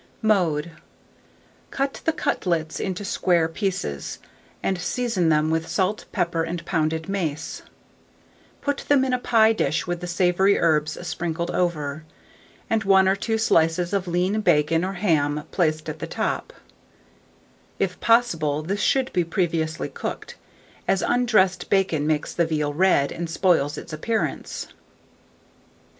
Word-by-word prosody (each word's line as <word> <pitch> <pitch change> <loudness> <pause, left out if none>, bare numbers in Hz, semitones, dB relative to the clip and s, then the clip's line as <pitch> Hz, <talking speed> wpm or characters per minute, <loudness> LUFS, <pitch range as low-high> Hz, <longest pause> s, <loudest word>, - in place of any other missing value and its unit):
Mode. 170 -7 +2 1.0
Cut 275 0 -2
the 320 - +3
cutlets 170 - -1
into 190 +1 -3
square 175 -3 +2
pieces, 165 - -3 0.5
and 190 -2 0
season 225 -7 0
them 155 0 +2
with 160 0 +1
pepper, - - -9
salt, 195 +2 0
and 170 -1 -1
pounded 160 -1 -1
mace; 165 -6 -3 1.0
put 285 -1 -1
them 275 -2 +4
in 260 - -1
a 250 - +1
pie 225 -2 +4
dish 155 -7 0
with 175 -1 -3
the 175 - -4
savoury 180 +2 +3
herbs 155 -2 +1
sprinkled 170 0 -3
over, 155 -4 -1 0.6
and 225 -1 +1
1 190 -1 +5
or 190 - +3
2 225 +2 -1
slices 175 -4 +2
of 195 -2 0
lean 180 +5 0
bacon 165 -2 +3
or 190 +1 -2
ham 150 -6 +1
placed 155 -3 0
at - - -5
the - - -4
top: - - -2 1.3
if - - -1
possible, 165 -11 +2
this 200 +6 -2
should 265 -2 +1
be 180 - +2
previously 165 -2 -1
cooked, - - -6 0.5
as 195 -1 +2
undressed 220 -7 +2
bacon 175 -7 +1
makes 155 -1 0
the 170 -1 +1
veal 150 -2 -1
red, 155 -4 +3
and 170 0 -4
spoils 165 -5 +2
its - - -8
appearance. 220 +9 -3
175 Hz, 140 wpm, -24 LUFS, 160-195 Hz, 1.3 s, 1